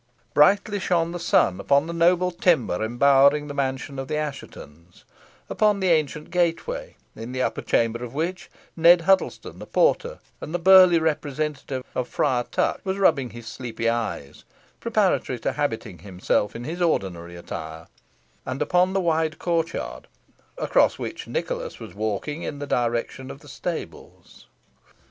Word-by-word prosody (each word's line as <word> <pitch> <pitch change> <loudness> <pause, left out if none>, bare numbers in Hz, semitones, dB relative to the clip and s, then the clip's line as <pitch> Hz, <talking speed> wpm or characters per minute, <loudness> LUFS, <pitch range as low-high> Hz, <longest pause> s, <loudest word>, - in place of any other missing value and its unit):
Brightly 200 +7 +4
shone 170 -3 0
the 175 - -5
sun 95 - +2
upon 140 +8 +2
the 170 - -5
noble 175 +2 +3
timber 145 - +1
embowering 140 +5 +4
the 145 - -6
mansion 135 0 -3
of 135 - -5
the 155 - -2
Asshetons; 90 - -8 0.4
upon 210 -2 +2
the 190 -1 +1
ancient 155 -1 0
gateway, 180 - -1 0.2
in 115 +3 -7
the 130 0 -1
upper - - -2
chamber 115 +1 0
of 125 +1 -8
which 175 +3 -3 0.3
Ned 170 +1 +6
Huddlestone, 190 +3 0
the - - -9
porter, - - +1 0.2
and 160 - -5
the - - +3
burly 185 0 +7
representative 150 -3 -2
of 125 - -2
Friar 125 -4 0
Tuck, - - 0
was 190 0 -2
rubbing 155 -10 +2
his 120 0 -11
sleepy 115 -1 -3
eyes, 110 -11 -4 0.4
preparatory - - 0
to - - -1
habiting 85 - -3
himself 95 +3 -1
in 115 - -6
his 165 +7 -5
ordinary 90 - -1
attire; 80 -1 -7 0.6
and 130 +1 -5
upon 180 +5 +2
the 195 - +1
wide 160 -2 0
court 165 -1 0
yard, - - -6 0.5
across - - +2
which - - -6
Nicholas - - -4
was - - -10
walking 110 +9 -3
in 145 - -5
the 145 - -5
direction 120 +1 -2
of 140 - -10
the 145 - -16
stables. 165 +4 -8
150 Hz, 155 wpm, -24 LUFS, 120-175 Hz, 0.6 s, burly